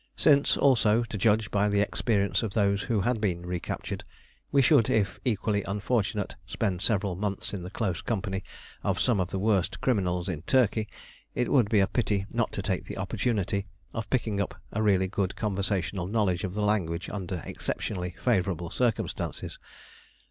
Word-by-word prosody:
Since, 140 Hz, -2 st, +4 dB
also, 120 Hz, -4 st, +4 dB
to 115 Hz, -, -6 dB
judge 105 Hz, +1 st, +2 dB
by 105 Hz, 0 st, +2 dB
the 100 Hz, 0 st, +2 dB
experience 100 Hz, -1 st, +1 dB
of 110 Hz, -4 st, -3 dB
those 100 Hz, -2 st, +2 dB
who 110 Hz, 0 st, 0 dB
had 115 Hz, +2 st, 0 dB
been 90 Hz, -4 st, -1 dB
recaptured, 90 Hz, -1 st, -4 dB, 0.5 s
we 140 Hz, -, +4 dB
should, 135 Hz, -4 st, +5 dB
if 105 Hz, -3 st, +1 dB
equally 105 Hz, -3 st, +1 dB
unfortunate, 105 Hz, +1 st, -1 dB
spend 95 Hz, -5 st, -1 dB
several 100 Hz, -3 st, +1 dB
months 100 Hz, +1 st, -3 dB
in 100 Hz, -, -3 dB
the 90 Hz, -, -6 dB
close 95 Hz, -5 st, -2 dB
company 100 Hz, -4 st, -2 dB, 0.4 s
of -, -, 0 dB
some 120 Hz, -5 st, +2 dB
of 90 Hz, -, +1 dB
the 95 Hz, -, -3 dB
worst 100 Hz, -2 st, +1 dB
criminals 90 Hz, -7 st, 0 dB
in 85 Hz, -6 st, -3 dB
Turkey, 110 Hz, 0 st, +2 dB, 0.5 s
it 125 Hz, -, 0 dB
would 120 Hz, -7 st, +4 dB
be 110 Hz, -, +4 dB
a -, -, +5 dB
pity 100 Hz, -3 st, 0 dB
not -, -, 0 dB
to -, -, -3 dB
take -, -, -1 dB
the -, -, -7 dB
opportunity 100 Hz, -4 st, -1 dB, 0.3 s
of 110 Hz, -2 st, -4 dB
picking 110 Hz, -5 st, 0 dB
up -, -, -4 dB
a 110 Hz, -, -1 dB
really 95 Hz, -3 st, +3 dB
good 95 Hz, 0 st, -1 dB
conversational 100 Hz, -3 st, -1 dB
knowledge 100 Hz, -4 st, +1 dB
of 95 Hz, -1 st, -3 dB
the 105 Hz, -, 0 dB
language 90 Hz, -5 st, 0 dB
under 95 Hz, -4 st, -4 dB
exceptionally 90 Hz, -3 st, -3 dB
favourable 90 Hz, -7 st, +1 dB
circumstances. 120 Hz, -3 st, -2 dB
100 Hz, 170 wpm, -28 LUFS, 95-110 Hz, 0.5 s, should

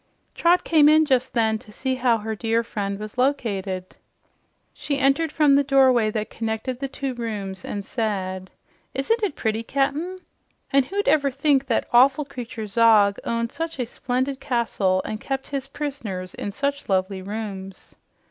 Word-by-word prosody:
Trot 345 Hz, +1 st, +3 dB
came 300 Hz, -3 st, +5 dB
in 310 Hz, +1 st, +5 dB
just 260 Hz, -3 st, +1 dB
then 220 Hz, -2 st, +2 dB
to 225 Hz, -3 st, -15 dB
see 260 Hz, +5 st, -2 dB
how 250 Hz, -2 st, +2 dB
her 220 Hz, 0 st, -4 dB
dear 225 Hz, +2 st, 0 dB
friend 200 Hz, -3 st, -3 dB
was 215 Hz, +4 st, -7 dB
located. 200 Hz, -9 st, -1 dB, 0.8 s
She 285 Hz, -2 st, -3 dB
entered 275 Hz, +4 st, +2 dB
from 300 Hz, -2 st, +4 dB
the 280 Hz, +1 st, +5 dB
doorway 260 Hz, -5 st, +4 dB
that 215 Hz, 0 st, -3 dB
connected 225 Hz, +3 st, -3 dB
the 275 Hz, -, -2 dB
two 270 Hz, 0 st, -4 dB
rooms 205 Hz, -5 st, -5 dB
and 200 Hz, -1 st, -5 dB
said, 190 Hz, -5 st, -3 dB, 0.5 s
"Isn't 445 Hz, -, +1 dB
it 405 Hz, -9 st, -1 dB
pretty, 220 Hz, -1 st, -1 dB
Cap'n? 280 Hz, +9 st, -1 dB, 0.6 s
And 275 Hz, -1 st, +5 dB
who'd 405 Hz, +1 st, -2 dB
ever 285 Hz, -2 st, +4 dB
think 275 Hz, 0 st, +1 dB
that -, -, 0 dB
awful 265 Hz, +4 st, +5 dB
creature 245 Hz, -5 st, -6 dB
Zog 210 Hz, -2 st, +4 dB
owned 230 Hz, 0 st, -1 dB
such 330 Hz, -1 st, -4 dB
a 250 Hz, -, -1 dB
splendid 260 Hz, +3 st, -2 dB
castle 230 Hz, -8 st, 0 dB
and 215 Hz, +1 st, -5 dB
kept 270 Hz, 0 st, -4 dB
his 275 Hz, -1 st, -3 dB
prisoners 230 Hz, -11 st, -5 dB
in 205 Hz, -, -5 dB
such 280 Hz, +4 st, -3 dB
lovely 190 Hz, 0 st, 0 dB
rooms?" 195 Hz, -2 st, -7 dB
240 Hz, 165 wpm, -23 LUFS, 210-275 Hz, 0.8 s, came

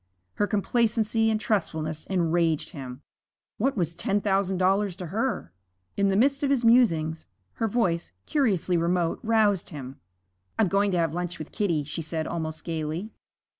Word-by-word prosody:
Her 205 Hz, -, +2 dB
complacency 225 Hz, +1 st, +1 dB
and 215 Hz, -1 st, +1 dB
trustfulness 160 Hz, -8 st, -1 dB
enraged 170 Hz, -3 st, +1 dB
him. 130 Hz, -1 st, -8 dB, 0.6 s
What 265 Hz, +3 st, +1 dB
was 170 Hz, -2 st, -1 dB
ten 195 Hz, +4 st, 0 dB
thousand 195 Hz, -2 st, +1 dB
dollars 190 Hz, +1 st, +2 dB
to 180 Hz, -, -6 dB
her? 225 Hz, -, -2 dB, 0.4 s
In 200 Hz, -, +2 dB
the 195 Hz, -, +1 dB
midst 275 Hz, +6 st, +3 dB
of 285 Hz, -, +1 dB
his 260 Hz, -4 st, +2 dB
musings, 165 Hz, -10 st, +3 dB, 0.3 s
her 225 Hz, -, +3 dB
voice, 185 Hz, -, 0 dB
curiously 195 Hz, -, +1 dB
remote, 170 Hz, 0 st, +1 dB
roused 215 Hz, -4 st, +2 dB
him. 135 Hz, -3 st, -8 dB, 0.6 s
'I'm 215 Hz, -5 st, +3 dB
going 200 Hz, +2 st, +2 dB
to 180 Hz, -, 0 dB
have 165 Hz, -2 st, +1 dB
lunch 175 Hz, 0 st, -3 dB
with 155 Hz, -, -8 dB
Kitty,' 170 Hz, -8 st, 0 dB
she 155 Hz, +4 st, -5 dB
said, 160 Hz, 0 st, -3 dB
almost 160 Hz, -2 st, -4 dB
gayly. 165 Hz, +5 st, -3 dB
185 Hz, 160 wpm, -26 LUFS, 160-215 Hz, 0.6 s, midst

